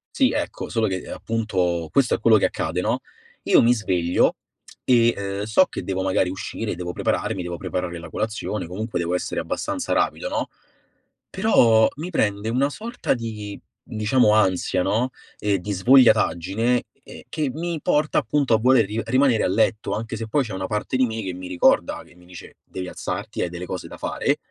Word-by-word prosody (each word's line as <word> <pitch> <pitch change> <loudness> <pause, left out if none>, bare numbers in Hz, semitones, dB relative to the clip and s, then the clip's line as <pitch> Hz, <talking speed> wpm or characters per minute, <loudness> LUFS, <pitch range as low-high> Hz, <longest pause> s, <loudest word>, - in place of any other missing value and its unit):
Sì, - - +3
ecco, - - -3
solo, 115 -1 +1
ehm, 95 -2 -2
che - - -12
appunto 90 -7 -1
questo 135 -3 +3
è - - 0
quello 110 -2 +5
che - - +2
accade, - - -2
no: - - 0 0.5
io - - +5
mi 120 +1 +5
sveglio, 90 -6 +1 0.5
e, 120 -2 +4
ehm, 100 0 -3
so 110 +12 +4
che - - -7
devo 95 -1 -2
magari 95 -1 +1
uscire, 95 +2 -4
devo 90 0 -5
prepararmi, 105 -3 -1
devo 85 0 -5
preparare 90 -1 -4
la 85 -1 -10
colazione, 105 -4 -3
comunque 105 +1 -4
devo 85 +1 -1
essere - - -2
abbastanza 285 - -3
rapido, - - 0
no, - - -2 0.8
però 115 - +4
mi 170 +5 -6
prende 105 -6 0
una 135 +4 +1
sorta 225 - -2
di, 105 -3 -6 0.2
diciamo 110 +1 +2
ansia, 95 -3 +2
no, 115 +6 +1 0.3
e 100 -2 +1
di 105 +3 -5
svogliataggine, 115 0 +3 0.2
ehm, - - -12
che 150 -3 -1
mi 165 +1 -3
porta 150 +1 +2
appunto 135 +2 0
a 110 - +4
voler 125 -2 +4
ri 110 +3 -3
rimanere 130 -1 +3
a - - +2
letto, 110 +3 +1
anche 115 +1 -4
se 115 0 -5
poi 135 +5 +1
c'è 110 - -7
una 95 0 -3
parte 105 +4 -2
di 130 -1 +3
me 110 -1 -4
che 95 -1 -4
mi 90 0 -8
ricorda, 90 -1 +2
che - - -20
mi 90 0 -20
dice: 90 - -12
"Devi 90 -1 -7
alzarti, - - -5
hai 90 - -1
delle 90 +1 -6
cose 90 0 -5
da - - -10
fare"; - - -1
110 Hz, 190 wpm, -23 LUFS, 95-125 Hz, 0.8 s, quello